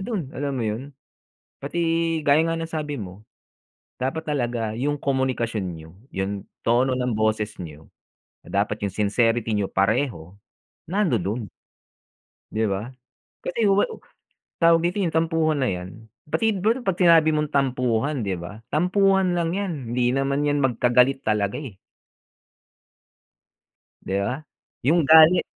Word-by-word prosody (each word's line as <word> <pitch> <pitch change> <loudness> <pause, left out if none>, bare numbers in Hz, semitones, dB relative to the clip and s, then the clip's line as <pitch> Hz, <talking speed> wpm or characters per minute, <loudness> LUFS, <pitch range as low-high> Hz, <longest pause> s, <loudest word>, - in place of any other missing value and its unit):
dun, 190 - -4
alam 140 -1 -3
mo 120 - -1
yun? 125 +6 -4 0.6
Pati 145 +5 -5 0.4
gaya 145 +3 +4
nga 165 - 0
ng 165 0 -4
sabi 150 -2 -3
mo, 100 -2 -8 0.7
dapat 155 +5 -3
talaga 120 -6 -1
yung 145 +4 -1
komunikasyon 130 -6 -1
niyo, 80 +1 -11 0.2
yung 95 +1 -3 0.2
tono 130 +2 +2
ng 125 -3 -1
boses 110 -1 0
niyo, 75 -1 -11 0.6
na - - -2
dapat - - -6
yung 100 - -1
sincerity 115 +2 +1
niyo 100 -2 -1
pareho, 100 - 0 0.5
nandodo'n. 125 - -1 1.1
Di 110 +1 0
ba? 100 +1 -2 0.6
Kasi 205 +3 0
wa 195 +1 +4 0.7
tawag 165 -1 +5
dito, 175 +4 -1
yung 170 - -1
tampuhan 160 -2 +1
na 130 - +2
yan, 90 0 -5 0.4
pati 225 -2 +1
bro 220 +7 0
'pag 190 - +2
sinabi 165 -3 +6
mong 150 -1 -1
tampuhan, 130 0 0
di 95 - 0
ba, 100 +6 -9
tampuhan 185 +2 +3
lang 170 -1 0
'yan. 195 -4 -2 0.2
Hindi 120 0 +1
naman 140 +2 0
'yan 145 0 +1
magkagalit 125 +2 +3
talaga, 105 0 0
eh. 125 -10 -8 2.3
Di 95 - -4
ba? 125 +9 -2 0.4
Yung 160 +1 +3
galit 160 +3 +7
135 Hz, 135 wpm, -24 LUFS, 110-160 Hz, 2.3 s, galit